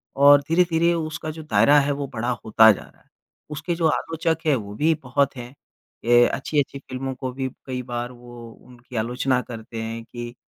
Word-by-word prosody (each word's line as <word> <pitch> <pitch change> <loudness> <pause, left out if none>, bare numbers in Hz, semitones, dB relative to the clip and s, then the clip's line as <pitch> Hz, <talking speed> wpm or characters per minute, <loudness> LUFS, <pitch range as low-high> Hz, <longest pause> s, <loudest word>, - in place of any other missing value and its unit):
और 145 +1 +7
धीरे-धीरे 170 0 +3
उसका 155 -1 -4
जो 160 0 -9
दायरा 145 -1 +4
है, 145 +1 0
वो 140 0 -3
बड़ा 120 -2 -3 0.2
होता 110 0 +7
जा 100 - -4
रहा। - - -22 0.4
उसके 170 +4 -3
जो 165 -1 +2
आलोचक 165 +1 -1
हैं, 150 -3 +4
वो 105 -3 -6
भी 160 +8 +2
बहुत 135 +2 0
हैं। 120 +1 -8 0.5
ये 120 0 +6
अच्छी-अच्छी 140 -1 -2
फिल्मों 130 0 -5
को 130 0 -5
भी 130 0 -3 0.2
कई 130 -1 -4
बार 120 0 -4
वो 120 -1 -12
उनकी 125 +1 -16
आलोचना 125 +3 0
करते 115 -1 -8
हैं 115 +1 -5
कि 120 0 -8
130 Hz, 185 wpm, -23 LUFS, 120-150 Hz, 0.5 s, और